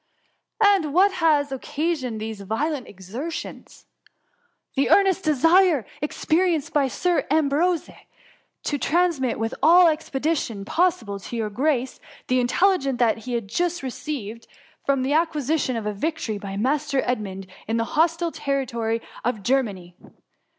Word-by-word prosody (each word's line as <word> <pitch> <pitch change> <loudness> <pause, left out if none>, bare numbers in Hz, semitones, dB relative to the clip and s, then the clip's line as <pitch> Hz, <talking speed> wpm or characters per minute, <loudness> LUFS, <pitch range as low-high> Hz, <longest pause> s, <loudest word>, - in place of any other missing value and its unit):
^ - - +7
^^ 405 - +6
And 310 -6 -3
what 390 +3 +5
has 305 -6 +2
occasioned 270 -3 -2
these 220 -1 -5
violent 255 +7 -2
ex 190 -1 -14
ertions 305 +7 -5
?^ - - -19 0.5
" - - -42
The 275 - +1
earnest 385 -2 +4
desire 325 - +4 0.2
experienced 320 +1 0
by 285 -2 +3
Sir 355 +6 0
Am 305 -1 +2
brose 335 +4 +1 0.8
to 290 - -1
transmit 320 -8 +1
with 225 +1 -2
all 345 +5 +7
the 330 - +6
expedition 285 -8 -2
possi 355 - +1
ble, 200 -1 -5
to 215 - -8
your 215 -2 -2
grace, 260 +1 0 0.3
the 255 0 +3
intelligence 275 0 +2 0.3
he 250 - -4
has 235 -1 -1
just 345 - -2
received 255 -4 -6 0.4
of 275 -2 +2
the 270 +2 0
acquisition 310 -4 0
of 225 -2 -4
a 210 - -1
victory 225 -3 -3
by 195 -1 -6
Mas 285 +7 0
ter 275 -2 +1
Edmund, 195 -6 -3 0.2
in 225 +1 0
the 230 - +1
hostile 335 +2 +2
territory 235 -6 -2 0.2
of 225 -4 -2
Ger 270 +6 +3
many. 185 -7 -8
275 Hz, 155 wpm, -23 LUFS, 230-325 Hz, 0.8 s, ^